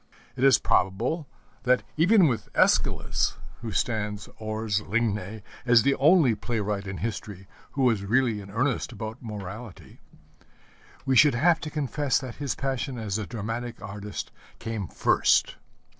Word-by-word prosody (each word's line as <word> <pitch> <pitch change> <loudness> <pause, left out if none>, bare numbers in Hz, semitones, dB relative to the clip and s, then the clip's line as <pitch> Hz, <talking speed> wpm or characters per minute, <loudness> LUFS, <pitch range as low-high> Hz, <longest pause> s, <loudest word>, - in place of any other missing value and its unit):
It 130 - -3
is 135 -1 +7
probable 120 - 0 0.3
that 125 0 +2
even 180 +3 +5
with 120 -5 -2
Æschylus, - - +2 0.3
who 115 -2 -5
stands 105 -2 -2
hors 110 -1 -1
ligne 105 -1 -2 0.2
as 120 -3 +5
the 140 - +3
only 150 -3 +5
playwright 105 -3 -3
in 95 0 -5
history 105 -4 -5 0.3
who 135 - 0
was 115 -6 +2
really 115 0 +1
in 100 - -11
earnest 125 +5 -1
about 110 +1 -7
morality, 105 -1 -8 1.1
we 135 -1 +2
should 145 0 +6
have 165 +6 +3
to 155 - -5
confess 145 -2 0
that 130 -3 -6
his 140 -3 -2
passion 135 -1 -3
as 110 -2 -2
a 105 - -4
dramatic 115 +1 -5
artist 100 +1 -6 0.3
came 110 -5 -4
first. - - +2
115 Hz, 145 wpm, -26 LUFS, 105-130 Hz, 1.1 s, is